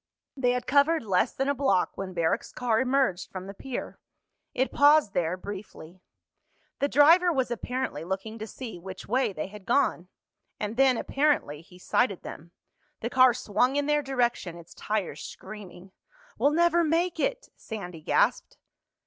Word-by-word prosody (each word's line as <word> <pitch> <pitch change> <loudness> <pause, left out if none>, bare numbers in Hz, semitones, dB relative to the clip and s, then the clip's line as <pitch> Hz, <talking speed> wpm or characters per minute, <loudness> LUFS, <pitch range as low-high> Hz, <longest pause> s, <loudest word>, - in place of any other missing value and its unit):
They 250 -3 +1
had 250 -1 -2
covered 290 +3 +3
less 195 +2 +1
than 270 - -2
a 280 - +2
block 260 -10 +1
when 185 -2 -6
Barrack's 165 -1 0
car 235 -3 0
emerged 260 -8 +1
from 185 -1 -7
the 200 - -8
pier. 255 +5 -6 0.6
It 260 +2 0
paused 290 -6 +5
there 175 +1 0
briefly. 185 -3 -9 0.8
The 280 - +2
driver 330 +6 +6
was 260 -5 -1
apparently 245 - -3
looking 195 +5 -5
to 220 - -5
see 225 -6 -8
which 185 +1 -9
way 260 -3 +1
they 155 -5 -4
had 205 +1 -11
gone. 235 -8 +1 0.5
And 210 +1 -3
then, 260 -1 +4
apparently, 275 - 0
he 180 +2 -17
sighted 200 +2 0
them. 165 +3 -9 0.5
The 235 - -3
car 255 -2 +6
swung 250 +4 +1
in 290 0 +1
their 295 0 +2
direction, 240 -10 -1
its 170 -1 -14
tires 200 -8 -3
screaming. 190 -3 -10 0.4
"We'll 285 - +3
never 340 +2 +3
make 335 +2 0
it!" - - -1
Sandy 180 -7 -8
gasped. - - +1
235 Hz, 160 wpm, -27 LUFS, 185-275 Hz, 0.8 s, driver